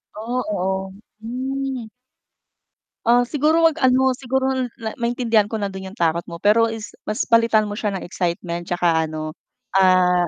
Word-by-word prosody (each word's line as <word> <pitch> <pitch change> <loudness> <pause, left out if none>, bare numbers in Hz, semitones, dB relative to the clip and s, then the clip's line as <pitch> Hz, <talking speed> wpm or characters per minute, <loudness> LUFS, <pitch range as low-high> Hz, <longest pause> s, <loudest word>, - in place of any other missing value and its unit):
Oh, 240 +4 -2
oo, 190 0 -2 0.3
hmm. 260 0 -4 1.2
Ah, 245 +1 +5
siguro 305 +5 +2
wag 325 -1 +3
ano, 260 0 +4
siguro 265 +1 -1 0.2
na 220 -1 -5
maintindihan 235 -3 +2
ko 220 - -5
na 200 -2 -2
dun 190 0 -7
yung 195 - -11
takot 170 -3 +1
mo 170 - -7
pero 210 +6 +4
is 225 -1 -6 0.2
mas 215 +4 0
palitan 230 -1 +4
mo 210 - -5
siya 205 -2 -1
ng - - -5
excitement 175 -1 -3
tsaka 170 -2 +1
ano, 155 0 -5 0.4
ah, 185 -2 +4
215 Hz, 160 wpm, -21 LUFS, 185-250 Hz, 1.2 s, Ah